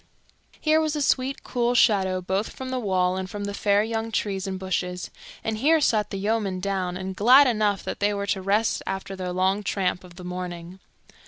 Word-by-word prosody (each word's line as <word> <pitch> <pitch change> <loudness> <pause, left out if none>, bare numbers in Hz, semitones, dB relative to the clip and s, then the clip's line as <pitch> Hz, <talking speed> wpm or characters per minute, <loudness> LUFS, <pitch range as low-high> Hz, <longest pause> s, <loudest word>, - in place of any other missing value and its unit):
Here 310 0 +3
was 310 -1 -1
a 300 - -1
sweet 265 0 0
cool 245 -1 0
shadow 190 -6 +3
both 190 +4 -1
from 260 0 -7
the 255 0 -2
wall 185 -4 +1
and 190 0 -4
from 205 +2 -5
the 200 0 -3
fair 205 0 +2
young 225 0 -3
trees 195 -2 -2
and 190 -1 -3
bushes, 180 -1 -3 0.3
and 220 -1 -2
here 315 +6 +4
sat 220 -7 +2
the 195 - -4
yeomen 200 -2 -1
down, 185 -2 -2
and 190 0 -5
glad 255 +8 +7
enough 210 -5 +1
they 205 0 -1
were 200 -1 -2
to 200 -1 -1
rest 205 +4 +1
after 195 0 -4
their 185 -1 -4
long 190 +3 +1
tramp 185 -2 -1
of 175 -1 -14
the 180 - -10
morning. 180 0 -6
200 Hz, 200 wpm, -25 LUFS, 185-225 Hz, 0.3 s, glad